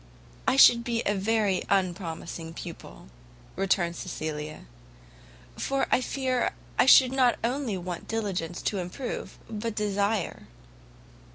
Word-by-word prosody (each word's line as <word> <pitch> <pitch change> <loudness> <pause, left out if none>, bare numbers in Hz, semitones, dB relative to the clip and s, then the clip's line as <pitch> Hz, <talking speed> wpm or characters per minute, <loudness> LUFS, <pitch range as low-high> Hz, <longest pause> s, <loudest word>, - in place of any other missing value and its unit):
"I - - +4
should 240 -3 +7
be 235 -1 -1
a 205 - +2
very 205 -1 +1
unpromising 170 -3 -2
pupil," 170 - -9 0.5
returned 185 -3 +1
Cecilia, 155 - -5 0.9
"for 275 0 0
I - - +4
fear 255 -1 -1 0.3
I - - +5
should 260 -1 +8
not 255 -2 +3
only 245 -3 -1
want 180 -1 -6
diligence 190 -6 -3
to 200 - -1
improve, 185 +9 -5
but 220 0 -4
desire." 205 -1 -1
200 Hz, 115 wpm, -27 LUFS, 175-235 Hz, 0.9 s, should